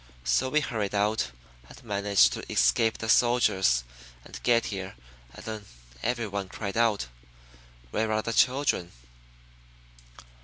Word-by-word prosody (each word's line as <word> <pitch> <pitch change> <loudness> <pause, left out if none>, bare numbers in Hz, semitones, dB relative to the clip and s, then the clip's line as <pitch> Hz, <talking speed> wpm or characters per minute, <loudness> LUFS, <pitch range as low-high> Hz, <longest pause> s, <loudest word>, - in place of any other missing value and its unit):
So 90 - +1
we 155 +3 +2
hurried 105 -7 -3
out, 105 +2 +1 0.4
and - - -14
managed 100 - +3
to - - -7
escape 115 -2 +3
the 115 - -5
soldiers, 105 - +3 0.4
and - - -10
get 115 -1 +3
here 95 -1 -6 0.4
and - - -11
then 110 -2 -6 0.4
everyone 105 -5 -2
cried 100 0 -5
out, 115 - +2 0.9
'Where 110 0 0
are 110 0 0
the 115 - -2
children?'" 125 -9 +2
110 Hz, 125 wpm, -27 LUFS, 100-115 Hz, 0.9 s, managed